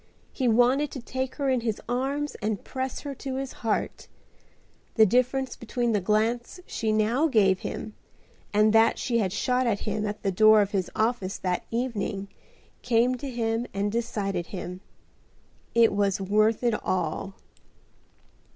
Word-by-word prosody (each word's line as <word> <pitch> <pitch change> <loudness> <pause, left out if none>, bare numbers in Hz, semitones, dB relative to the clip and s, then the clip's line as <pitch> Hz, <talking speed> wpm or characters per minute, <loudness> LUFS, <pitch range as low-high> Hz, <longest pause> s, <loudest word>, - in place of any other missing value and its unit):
He 260 - 0
wanted 245 +5 +3
to 270 - -5
take 260 +2 -4
her 280 -2 -2
in 260 -2 +2
his 225 -3 -2
arms 275 +4 -1
and 210 -1 -2
press 260 0 -4
her 285 -1 -5
to 270 0 -5
his 270 0 -3
heart. 225 -2 -2 0.9
The 220 - +7
difference 255 +4 +1
between 235 +1 -2
the 205 -2 +1
glance 220 - 0
she 220 -1 -2
now 225 +8 +2
gave 195 - +3
him 215 - -6 0.6
and 215 +1 +4
that 225 +1 +5
she 235 -2 0
had 190 -4 0
shot 250 +5 +1
at 205 -4 0
him 210 0 -2
at 205 0 -5
the 195 - +1
door 215 +3 +6
of 200 - -5
his 190 -3 -1
office 220 -4 0
that 180 -1 -2
evening 220 -4 -2 0.5
came 245 +1 +2
to 275 +2 -6
him 230 -1 -1
and 200 +1 0
decided 205 -6 -2
him. 180 -1 -6 0.9
It 230 -3 +5
was 200 -1 +1
worth 215 +4 +2
it 240 -2 +2
all. 185 +2 -2
225 Hz, 160 wpm, -26 LUFS, 205-250 Hz, 0.9 s, The